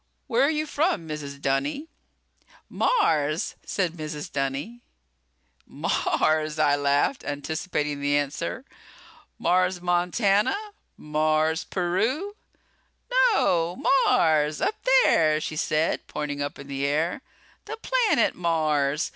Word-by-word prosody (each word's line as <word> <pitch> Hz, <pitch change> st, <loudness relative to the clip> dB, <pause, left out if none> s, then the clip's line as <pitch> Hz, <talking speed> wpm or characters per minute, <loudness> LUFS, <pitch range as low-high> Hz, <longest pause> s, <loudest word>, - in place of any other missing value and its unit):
"Where 235 Hz, -, +1 dB
are 280 Hz, -, +4 dB
you 310 Hz, 0 st, -1 dB
from, 295 Hz, -, -1 dB
Mrs. 145 Hz, -2 st, -6 dB
Dunny?" 140 Hz, -, -1 dB, 0.8 s
"Mars!" 160 Hz, -, +1 dB
said 180 Hz, -4 st, -1 dB
Mrs. 155 Hz, -2 st, -6 dB
Dunny. 140 Hz, -, -3 dB, 0.9 s
"Mars!" 155 Hz, 0 st, 0 dB
I 145 Hz, -2 st, +3 dB
laughed, 145 Hz, -, +1 dB
anticipating 145 Hz, 0 st, -3 dB
the 145 Hz, 0 st, +2 dB
answer. 145 Hz, -, -3 dB, 0.7 s
"Mars, 180 Hz, +1 st, +1 dB
Montana? 195 Hz, -, +1 dB, 0.4 s
Mars, 155 Hz, +2 st, 0 dB
Peru?" 230 Hz, -, -1 dB, 1.0 s
"No, 175 Hz, -, +1 dB, 0.3 s
Mars! 155 Hz, -9 st, +2 dB
Up 430 Hz, +2 st, -2 dB, 0.2 s
there," 155 Hz, -1 st, +3 dB
she 155 Hz, -, -5 dB
said, 155 Hz, +1 st, 0 dB
pointing 145 Hz, -1 st, -4 dB
up 145 Hz, -, -4 dB
in 140 Hz, -, -10 dB
the 140 Hz, 0 st, -4 dB
air. 155 Hz, -, 0 dB, 0.4 s
"The 445 Hz, +2 st, -6 dB
planet 455 Hz, -, +2 dB
Mars. 155 Hz, -4 st, 0 dB
155 Hz, 105 wpm, -25 LUFS, 145-195 Hz, 1.0 s, are